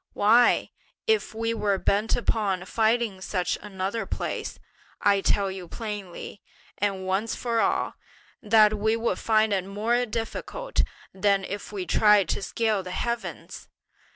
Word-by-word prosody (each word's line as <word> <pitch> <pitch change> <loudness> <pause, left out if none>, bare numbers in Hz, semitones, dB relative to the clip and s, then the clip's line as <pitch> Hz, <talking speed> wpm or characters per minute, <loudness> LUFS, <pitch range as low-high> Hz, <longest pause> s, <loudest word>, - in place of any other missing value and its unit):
why, 230 +4 +4 0.3
if 440 - +1
we 225 +1 -1
were 205 -3 +1
bent 205 +3 +1
upon 200 -6 0
finding 220 -2 +1
such 180 -2 -1
another 200 +2 -3
place, - - -4 0.4
I 200 -1 +3
tell 195 0 +1
you 190 -2 -7
plainly, 205 -2 -7 0.4
and 195 -2 -1
once 195 +4 -1
for 235 -2 -1
all, - - +1 0.5
that 215 -2 +5
we 215 +1 +1
would 230 +1 -1
find 220 -1 +2
it 190 -2 +1
more 225 +6 0
difficult 230 - -2 0.3
than 195 0 +2
if 200 +2 -6
we 195 -3 -4
tried 210 -4 +4
to - - -1
scale 220 -1 0
the 185 - -8
heavens! 235 +5 -4
210 Hz, 140 wpm, -26 LUFS, 195-225 Hz, 0.5 s, that